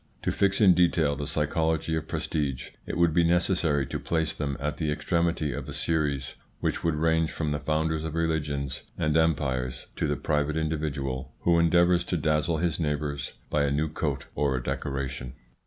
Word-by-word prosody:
To - - +1
fix 100 0 +2
in 95 -4 +7
detail 85 -4 +3
the 70 0 -4
psychology 80 +2 0
of 80 0 -3
prestige, 70 -5 -2 0.2
it - - -3
would 85 -2 +3
be 85 +1 +4
necessary 85 -4 +2
to - - -4
place 80 -1 -1
them 70 -2 -3
at 75 +2 -2
the 80 -2 -1
extremity 85 -1 0
of - - -5
a - - -5
series, 75 -5 0 0.3
which - - -1
would 85 -2 +1
range 80 +1 +2
from 75 -2 -2
the 75 - -1
founders 80 +1 0
of 80 -1 -4
religions 75 -5 -1 0.2
and 75 -1 +1
empires 70 -6 +1
to - - 0
the - - 0
private 75 0 0
individual 75 -4 -2
who 85 -1 +4
endeavours 85 +1 +4
to 90 - -1
dazzle 75 +2 +1
his 85 0 0
neighbours 75 -2 -2 0.2
by 75 - +2
a 70 - 0
new 75 +2 +1
coat 75 -3 -2
or 70 -2 +1
a - - -4
decoration. 65 -2 -3
75 Hz, 185 wpm, -27 LUFS, 70-80 Hz, 0.3 s, in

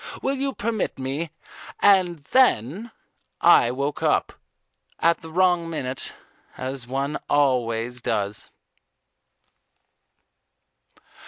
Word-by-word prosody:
Will 270 - +1
you 275 0 -2
permit 220 -2 -2
me 135 +5 -3 0.3
" - - -15
And 180 -6 +4
then 215 - +3 0.5
I 120 - +6
woke 140 +3 -3
up - - +1 0.6
at 170 0 +2
the 160 - -10
wrong 175 -1 +2
minute, 135 -5 -4 0.4
as 130 -2 -5
one 135 +3 -2
always 125 -4 +1
does. 100 -3 -1
145 Hz, 95 wpm, -24 LUFS, 130-180 Hz, 0.6 s, I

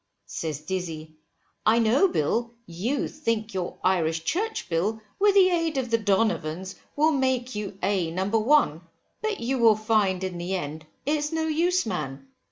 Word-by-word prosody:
Says 155 -3 -4
Dizzy, 160 -3 -5 0.5
I 220 +2 +4
know 235 - +4
Bill, 235 - -1
you 220 +11 -2
think 230 -7 -2
your 185 -2 -3
Irish 165 -3 +1
Church 425 - -2
Bill, 190 +6 0 0.2
with 405 0 +4
the 375 -2 +6
aid 330 -4 0
of 250 -3 -2
the 230 - +3
donovans, 190 -4 0 0.2
will 310 +2 +4
make 260 -3 0
you 205 -2 -5
A 190 -4 +1
No. 185 +3 -2
1, 220 - +3 0.4
but 435 -2 -2
you 255 +2 -1
will 225 -2 +6
find 210 -4 +1
in 185 -2 -4
the 180 +2 -2
end 155 -2 -5 0.2
it's 295 +1 0
no 320 0 0
use 345 +4 +1
man. 135 -9 -4
215 Hz, 165 wpm, -26 LUFS, 175-275 Hz, 0.5 s, the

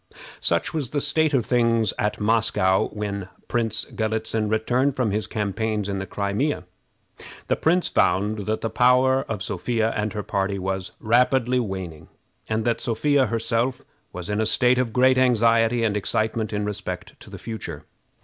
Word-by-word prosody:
Such 85 0 0
was 145 -6 -2
the 145 - -1
state 150 +2 +1
of 130 -6 +1
things 115 -3 +2
at 105 0 -1
Moscow 105 -3 +2
when 100 -2 -5 0.2
Prince 115 -2 -1
Galitzin 110 -1 -2
returned 125 +5 +1
from 125 -5 0
his 105 +2 -1
campaigns 105 0 -2
in 100 -1 -2
the 95 - -5
Crimea. 105 +9 -1 0.9
The - - +3
prince 175 +3 +2
found 105 +2 +1
that 110 0 -1
the 115 - -2
power 130 +2 +4
of 105 -3 -4
Sophia 110 +4 -1
and 105 -1 -1
her 105 -1 -3
party 100 0 -1
was 95 0 -3
rapidly 125 +2 +2
waning, 95 -8 -5 0.4
and 110 0 -1
that 120 -1 0
Sophia 135 +4 +2
herself 115 +2 -1 0.3
was 90 -1 -7
in 105 +1 0
a - - +1
state 125 +2 +3
of 125 -3 0
great 130 +2 +4
anxiety 115 -1 +3
and 105 -2 +1
excitement 110 +2 -1
in 105 -1 -2
respect 100 -3 -5
to - - -14
the - - -8
future. 85 -10 -7
110 Hz, 165 wpm, -24 LUFS, 105-125 Hz, 0.9 s, power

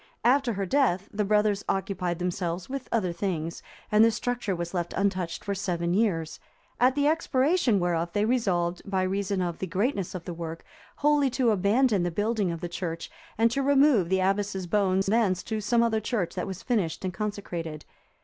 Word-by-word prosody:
After 250 0 +3
her 200 -1 -2
death, 200 -5 +1
the 210 +1 0
brothers 210 0 +2
occupied 185 -3 -1
themselves 175 0 -3
with 270 -1 -6
other 185 -7 0
things, 170 -3 -3 0.3
and 210 +1 +6
this 225 -1 +4
structure 240 -6 -2
was 170 +1 -5
left 175 -2 -2
untouched 185 -4 -1
for 200 - -1
seven 175 -3 -1
years, 180 -7 0 0.4
at 255 +1 +4
the 285 0 +1
expiration 295 - +2
whereof 170 -1 0
they 205 +2 +1
resolved, 180 -8 0
by 190 -2 -1
reason 195 0 -1
of 175 -2 -3
the 190 - -3
greatness 195 +1 -1
of 175 - -6
the 175 - -5
work, 165 -1 -7 0.3
wholly 295 -2 +3
to 250 -2 +2
abandon 210 +2 +3
the 175 - 0
building 205 +2 0
of 170 -1 -4
the 175 - -3
church, 165 -1 -5 0.3
and 225 +1 +3
to 275 - 0
remove 275 - +4
the 190 0 +2
abbess's 195 0 0
bones 190 +1 +1
thence 200 -3 +2
to 220 -1 -3
some 230 +3 +2
other 225 -1 +1
church 210 -5 -2
that - - -3
was 190 -1 -6
finished 195 -8 -1
and 185 - -2
consecrated. 170 -6 -5
195 Hz, 190 wpm, -27 LUFS, 175-230 Hz, 0.4 s, and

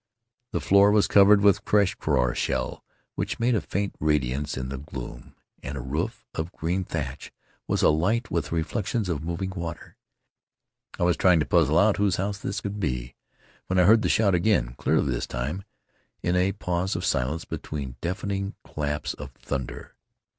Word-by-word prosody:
The 85 - -1
floor 100 +6 +5
was 105 -1 +4
covered 100 0 +6
with 100 0 +4
crushed 100 -3 +2
krora 65 -5 +1
shell - - -2 0.3
which - - -3
made 120 +2 +2
a 110 - +1
faint 100 +1 -2
radiance 70 -2 0
in 65 0 -4
the 70 -1 -5
gloom, 65 -3 -8 0.3
and 70 +2 -5
a - - -4
roof 70 +6 -3
of 80 +2 -3
green 90 +4 -1
thatch 75 -6 -5 0.4
was - - 0
alight 95 +11 +2
with 80 -4 -1
the - - -2
reflections 95 +5 -1
of 80 -4 -2
moving 85 +3 -3
water. 85 -3 -7 1.0
I - - +1
was 85 0 +3
trying 90 -3 +5
to - - 0
puzzle 75 - +3
out 100 +3 +4
whose 100 -3 +2
house 100 +1 -2
this 95 +1 -3
could 100 +1 -4
be 60 -8 -2 0.5
when 95 - 0
I 90 - +6
heard 110 +3 +6
the - - 0
shout 100 -3 +3
again, 85 - +2
clearly - - +1
this - - -3
time, 75 +11 -4 0.6
in 85 +2 +1
a 95 +2 +2
pause 90 +2 -2
of 90 - -2
silence 70 +5 0
between 70 -4 -5
deafening 100 +2 -3
claps 75 0 -3
of - - -8
thun 65 -3 -4
der. - - -10
85 Hz, 180 wpm, -26 LUFS, 75-100 Hz, 1.0 s, covered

